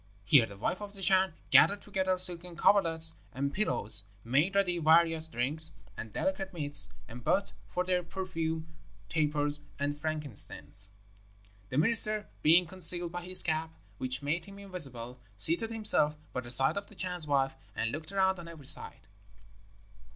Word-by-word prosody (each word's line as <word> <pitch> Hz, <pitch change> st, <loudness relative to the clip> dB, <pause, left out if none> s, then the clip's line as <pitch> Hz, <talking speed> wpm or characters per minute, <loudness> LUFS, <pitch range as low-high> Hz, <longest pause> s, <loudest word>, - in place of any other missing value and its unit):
Here 115 Hz, +2 st, +4 dB
the 100 Hz, -, -13 dB
wife 180 Hz, -, -4 dB
of 205 Hz, -1 st, -9 dB
the 195 Hz, -, -10 dB
Chan 190 Hz, -2 st, +3 dB, 0.2 s
gathered 200 Hz, 0 st, +4 dB
together 190 Hz, -2 st, -2 dB
silken 180 Hz, -1 st, -3 dB
coverlets 165 Hz, -4 st, +5 dB, 0.2 s
and 140 Hz, +2 st, -3 dB
pillows, 105 Hz, -, 0 dB, 0.2 s
made 145 Hz, +11 st, 0 dB
ready 180 Hz, -3 st, 0 dB
various 160 Hz, 0 st, +3 dB
drinks 150 Hz, +5 st, +1 dB, 0.2 s
and 110 Hz, -, -9 dB
delicate 190 Hz, -, -4 dB
meats, 145 Hz, -3 st, +4 dB, 0.2 s
and 120 Hz, 0 st, -12 dB
burnt 195 Hz, -, 0 dB
for 180 Hz, -, -3 dB
their 180 Hz, -1 st, -1 dB
perfume 165 Hz, -3 st, -5 dB, 0.4 s
tapers 150 Hz, +1 st, -1 dB, 0.2 s
and 145 Hz, +1 st, -3 dB
frankincense. 150 Hz, -9 st, -2 dB, 0.8 s
The 130 Hz, -, -5 dB
minister 215 Hz, +3 st, +2 dB
being 170 Hz, +4 st, +4 dB
concealed 175 Hz, 0 st, +6 dB
by 175 Hz, 0 st, -6 dB
his 185 Hz, +1 st, +2 dB
cap, 160 Hz, 0 st, -3 dB, 0.2 s
which 130 Hz, +1 st, 0 dB
made 160 Hz, +4 st, -2 dB
him 200 Hz, 0 st, -13 dB
invisible, 135 Hz, -11 st, -5 dB, 0.2 s
seated 170 Hz, -, +3 dB
himself 210 Hz, -10 st, +2 dB, 0.2 s
by -, -, -3 dB
the 120 Hz, -, -11 dB
side 135 Hz, +8 st, 0 dB
of 200 Hz, -, -5 dB
the 210 Hz, -, -18 dB
Chan's 180 Hz, -3 st, -1 dB
wife, 135 Hz, -2 st, 0 dB, 0.2 s
and 115 Hz, -, -3 dB
looked 155 Hz, +3 st, -7 dB
around 190 Hz, -1 st, 0 dB
on 170 Hz, -, -11 dB
every 160 Hz, -4 st, -13 dB
side. -, -, +1 dB
165 Hz, 160 wpm, -29 LUFS, 145-185 Hz, 0.8 s, concealed